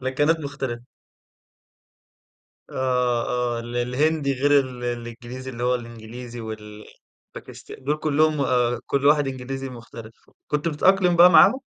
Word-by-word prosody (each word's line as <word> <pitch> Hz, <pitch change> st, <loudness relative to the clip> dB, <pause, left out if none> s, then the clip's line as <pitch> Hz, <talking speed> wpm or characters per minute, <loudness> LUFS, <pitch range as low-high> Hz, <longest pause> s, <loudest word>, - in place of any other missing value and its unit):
لكنات 145 Hz, +5 st, +1 dB
مختلفة. 135 Hz, -5 st, -5 dB, 1.9 s
آه 125 Hz, -2 st, 0 dB
آه، 125 Hz, -1 st, -1 dB
ال 120 Hz, +1 st, -7 dB
الهندي 140 Hz, +4 st, 0 dB
غير 145 Hz, +2 st, +3 dB
ال 125 Hz, -2 st, -5 dB
الإنجليزي 120 Hz, +2 st, -6 dB
اللي 120 Hz, 0 st, -6 dB
هو 125 Hz, 0 st, +2 dB
الإنجليزي 120 Hz, 0 st, -8 dB
والباكستا 105 Hz, -1 st, -11 dB
دول 150 Hz, +3 st, -1 dB
كلّهم 155 Hz, 0 st, +1 dB
آآ، 125 Hz, -2 st, +1 dB
كل 140 Hz, 0 st, -1 dB
واحد 145 Hz, -1 st, +4 dB
إنجليزي 135 Hz, +1 st, -5 dB
مختلف، 115 Hz, -2 st, -11 dB, 0.3 s
كنت 150 Hz, +2 st, -1 dB
بتتأقلم 180 Hz, +3 st, +3 dB
بقى 175 Hz, +1 st, +8 dB
معاهم؟ 255 Hz, +9 st, +6 dB
130 Hz, 125 wpm, -23 LUFS, 120-145 Hz, 1.9 s, بقى